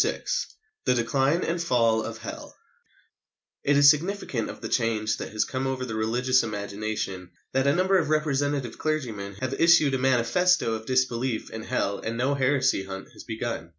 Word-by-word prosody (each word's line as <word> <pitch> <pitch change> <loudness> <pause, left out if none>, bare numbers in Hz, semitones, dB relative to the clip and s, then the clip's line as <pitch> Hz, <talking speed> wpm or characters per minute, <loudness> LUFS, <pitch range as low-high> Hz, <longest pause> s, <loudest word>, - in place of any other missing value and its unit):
VI - - -2 0.6
THE 125 - +3
DECLINE 135 +7 +1
AND 170 +1 -1
FALL 115 -8 +2
OF - - -5
HELL - - -8 1.1
It 140 0 +3
is 145 0 +9
significant 155 - -2
of - - -8
the - - -5
change 110 -3 0
that - - -6
has 110 0 0
come 130 0 -3
over 130 -1 -2
the 115 - -5
religious 125 +4 +2
imagination 100 -3 -4 0.2
that 135 +1 +2
a 140 - +3
number 185 +1 +3
of 155 -4 -2
representative 145 -4 0
clergymen 115 -11 -3
have 130 0 -2
issued 165 -4 +5
a 130 - +1
manifesto 130 +3 +2
of 110 0 -5
disbelief 130 -2 0
in 110 - -6
Hell 100 -5 -1
and 115 +1 -4
no 130 +4 +1
heresy 130 -6 +1
hunt 95 0 -8
has - - -12
begun. 115 -6 -4
130 Hz, 175 wpm, -26 LUFS, 110-145 Hz, 1.1 s, is